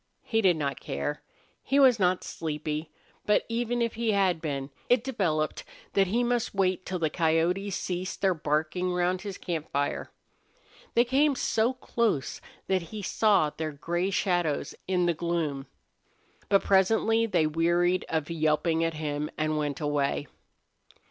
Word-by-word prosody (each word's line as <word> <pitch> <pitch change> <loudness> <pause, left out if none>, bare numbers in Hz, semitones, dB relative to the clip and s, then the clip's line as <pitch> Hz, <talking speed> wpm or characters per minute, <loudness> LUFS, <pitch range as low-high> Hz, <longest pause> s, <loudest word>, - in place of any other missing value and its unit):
He 225 -1 +1
did 180 -5 +4
not 140 -2 -2
care. 145 0 -3 0.4
He 275 - 0
was 260 -5 +6
not 180 -1 +2
sleepy, 155 0 -4 0.4
but 210 - +3
even 240 +1 0
if 230 - -1
he 230 -1 0
had 185 -5 +2
been 140 -3 -3 0.2
it 245 -2 +4
developed 170 - -1 0.3
that 195 -1 +3
he 235 +6 +1
must 240 -3 0
wait 185 -1 +1
till 185 - -2
the 160 -3 0
coyotes 175 +5 +1
ceased 185 -1 -3
their 190 -2 +3
barking 160 +3 -1
round 180 +1 +1
his 200 -2 -6
camp 165 -4 -4
fire. 145 0 -2 0.9
They 235 - +5
came 275 +3 +3
so 230 0 +1
close 235 - -1 0.2
that 190 -1 +1
he 215 -2 -6
saw 200 -6 +3
their 155 0 -4
gray 175 +6 -1
shadows 175 -6 0
in 180 -1 +2
the 170 - +2
gloom. 155 -5 -2 0.8
But 195 -1 +4
presently 220 +4 +3
they 175 -7 +2
wearied 170 +3 +2
of 160 0 -1
yelping 160 +1 +1
at 165 -1 -1
him 150 -1 -3
and 155 0 0
went 150 -2 -2
away. 145 -2 0
175 Hz, 155 wpm, -28 LUFS, 155-205 Hz, 0.9 s, was